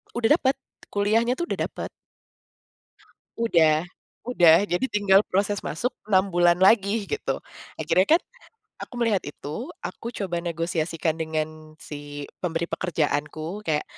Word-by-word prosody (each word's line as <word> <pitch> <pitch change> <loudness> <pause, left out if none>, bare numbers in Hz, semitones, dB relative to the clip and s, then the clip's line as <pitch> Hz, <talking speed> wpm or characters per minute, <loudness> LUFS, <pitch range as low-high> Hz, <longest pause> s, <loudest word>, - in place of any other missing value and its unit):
Udah 240 +8 +4
dapet, 265 0 +2 0.4
kuliahnya 225 +4 +2
tuh 345 +5 -4
udah - - 0
dapet. - - -7 1.5
Udah 160 -9 +4 0.4
udah 175 -6 +5
jadi 180 +6 0
tinggal 200 -1 +4
proses 200 +1 0
masuk 240 +12 -2 0.2
6 190 -1 +3
bulan 175 0 +4
lagi 200 +2 +4
gitu 435 - -3 0.3
akhirnya 185 +1 +2
kan, - - -4 0.6
aku - - -8
melihat 230 -5 +2
itu 150 - -6 0.2
aku 230 - -5
coba 175 -4 -2
negosiasikan 165 -1 -1
dengan 155 0 -4
si 145 -1 -8 0.2
pemberi 170 -1 -1
pekerjaanku 160 +1 -2
kayak 150 -1 +1
175 Hz, 125 wpm, -25 LUFS, 160-210 Hz, 1.5 s, udah